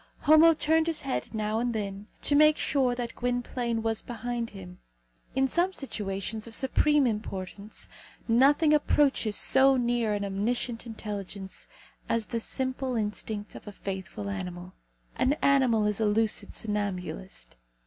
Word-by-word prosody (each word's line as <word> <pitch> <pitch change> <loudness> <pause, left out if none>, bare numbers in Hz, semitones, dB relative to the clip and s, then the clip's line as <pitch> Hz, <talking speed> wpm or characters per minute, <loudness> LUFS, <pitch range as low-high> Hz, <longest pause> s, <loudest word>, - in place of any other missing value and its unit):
Homo 315 +2 +7
turned 320 +2 +2
his 325 -2 -1
head 270 -1 -3
now 215 0 -1
and 240 -1 -1
then, 200 -1 -4 0.2
to - - +4
make 305 +1 +6
sure 260 -4 +1
that 240 -1 -4
Gwynplaine 245 -2 -2
was 225 -1 -1
behind 240 -1 -4
him. 90 -1 -11 0.6
In 270 0 +3
some 350 +7 +1
situations 215 - -4
of 225 - -3
supreme 295 +2 +3
importance 210 -2 -4 0.4
nothing 285 +6 +4
approaches 280 -7 +2
so 265 0 +4
near 240 -3 +1
an 200 0 -2
omniscient 230 +4 -2
intelligence 205 -3 -6 0.4
as 230 -1 +1
the 230 - -3
simple 260 +1 -2
instinct 210 -1 -3
of - - -11
a - - -5
faithful 190 0 -6
animal. 180 -2 -5 0.4
An 255 +2 +3
animal 260 -7 +3
is 210 0 0
a 220 - +2
lucid 215 +1 +1
somnambulist. 185 - -4
230 Hz, 140 wpm, -28 LUFS, 205-265 Hz, 0.6 s, Homo